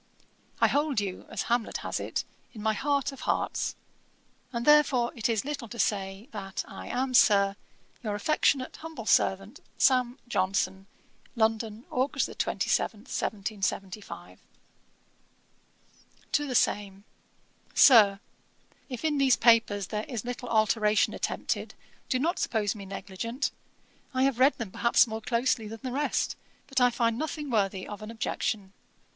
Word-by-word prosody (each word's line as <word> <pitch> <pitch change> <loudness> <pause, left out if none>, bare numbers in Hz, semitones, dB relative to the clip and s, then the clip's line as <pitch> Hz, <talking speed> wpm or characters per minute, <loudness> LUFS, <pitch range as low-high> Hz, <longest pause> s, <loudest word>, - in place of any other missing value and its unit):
I - - +5
hold 290 -4 +1
you, 195 -3 -5
as - - -3
Hamlet 235 -1 0
has - - -2
it, - - -3 0.3
'in 215 -3 -8
my 220 0 +2
heart 280 +3 0
of 275 - -11
hearts,' - - -1 0.8
and 235 -1 -3
therefore, 290 -5 +5
it 230 0 -1
is 225 +1 0
little 285 -5 -4
to 235 - -9
say, 195 0 -1
that 195 -2 -5
I - - -9
am, 255 +1 -1
Sir, 200 -4 +5 0.5
'Your 215 -4 -2
affectionate 260 +3 +1
humble 320 -8 -8
servant, 195 +5 +2 0.2
'SAM. 255 -1 +3
JOHNSON.' 190 -2 0 0.5
'London, 220 0 0
Aug. 260 +3 0 0.2
27, 210 -3 0
1775.' 200 -3 -4 1.9
TO 295 - +2
THE 255 - -3
SAME. 200 -3 +1 0.7
'SIR, 210 -7 +7 0.7
'If 255 +3 -5
in 295 -2 +1
these 265 -2 +5
papers 225 -4 +4
there 210 0 -3
is 240 -4 -5
little 245 0 -5
alteration 215 -1 +3
attempted, - - -3 0.3
do 255 - +2
not 325 +7 0
suppose 210 -3 0
me 200 -3 -9
negligent. 200 +7 -4 0.6
I 260 - +3
have 270 -3 +1
read 270 +3 +5
them 225 -6 -5
perhaps 235 +6 +4
more 220 -1 -5
closely 235 -1 0
than 225 0 -8
the 255 - -3
rest; 290 +3 0 0.3
but 270 -2 -1
I 250 - +6
find 230 -1 0
nothing 300 -2 -4
worthy 195 -4 0
of 205 0 -8
an 215 - -7
objection. 215 -3 -3
230 Hz, 140 wpm, -28 LUFS, 205-255 Hz, 1.9 s, SIR